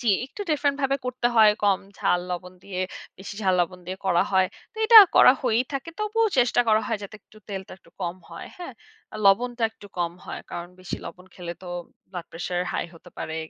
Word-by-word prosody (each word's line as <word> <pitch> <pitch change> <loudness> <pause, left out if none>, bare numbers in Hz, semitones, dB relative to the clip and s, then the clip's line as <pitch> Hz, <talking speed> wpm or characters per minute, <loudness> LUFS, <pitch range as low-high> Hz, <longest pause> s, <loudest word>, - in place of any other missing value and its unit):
জ্বী, 230 -5 +3
একটু 270 +10 -12
ডিফারেন্ট 285 -2 +1
ভাবে 275 0 +2
করতে 250 -1 -1
হয়, 215 -1 +7
কম 195 -2 +3 0.2
ঝাল, 180 - +2
লবণ 180 +1 -5
দিয়ে 185 -2 -4 0.4
বেশি 195 +1 -8
ঝাল 185 -1 +3
লবণ 180 +1 -2
দিয়ে 185 +1 -5
করা 175 -2 +4
হয়। 190 -1 +4 0.3
তো - - -34
এটা 460 -1 +11 0.2
করা - - +9
হয়েই 245 0 +2
থাকে। 275 +5 -4
তবুও 435 +1 +1
চেষ্টা 245 0 +4
করা 215 0 +5
হয় 225 -3 -1
যাতে 200 +2 -8
একটু 215 - -20
তেলটা 190 -1 -6
একটু 165 - -23
কম 175 +1 -3
হয়। 165 - -9
হ্যাঁ? 355 - -8 0.5
লবণটা 240 +4 +3
একটু 205 - -14
কম 170 -1 0
হয়। - - -6
কারণ 175 0 -6
বেশি 185 - -5
লবণ 180 +1 -11
খেলে 175 -2 -6
তো 180 - -8 0.4
ব্লাড 175 -3 -7
প্রেশার 175 +1 -3
হাই - - -1
হতে 170 +2 -15
পারে। 160 - -4
195 Hz, 205 wpm, -25 LUFS, 180-250 Hz, 0.5 s, এটা